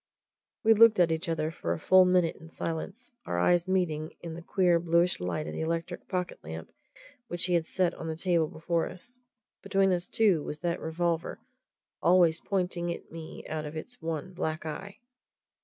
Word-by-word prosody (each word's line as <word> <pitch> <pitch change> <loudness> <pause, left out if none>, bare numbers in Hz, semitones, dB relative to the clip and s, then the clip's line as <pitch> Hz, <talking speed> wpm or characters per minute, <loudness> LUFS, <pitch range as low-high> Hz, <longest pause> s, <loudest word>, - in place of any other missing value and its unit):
We 225 0 +7
looked 225 -1 +6
at 170 -2 +5
each 160 +2 -2
other 160 -1 -1
for 85 - -2
a 85 - -5
full 185 0 +6
minute 180 -2 +2
in 165 - -13
silence 175 +9 -5 0.2
our 85 - -1
eyes 175 - +3
meeting 165 -4 0
in 170 -1 -6
the 170 - -7
queer, 175 0 +3
bluish 170 +1 +2
light 90 +13 -2
of - - -5
the - - -4
electric 165 +1 -3
pocket 180 -2 -3
lamp 80 +1 -7 0.6
which 175 0 0
he 180 - 0
had 165 -2 +2
set 180 -2 +1
on 165 - -7
the 160 - -2
table 170 -1 +1
before 165 +2 -1
us. 240 +8 -7 0.4
Between 195 -1 +2
us, 175 -1 0
too, 200 -8 +3
was 150 - -5
that 170 -1 -1
revolver 165 +2 -1 0.6
always 170 -2 +5
pointing 180 -3 -1
at - - -8
me 165 -1 -9
out 155 -1 -3
of 150 +1 -6
its 245 +10 -8
one 165 +3 -4
black 160 -2 -3
eye. 190 +6 -6
170 Hz, 190 wpm, -29 LUFS, 160-185 Hz, 0.6 s, We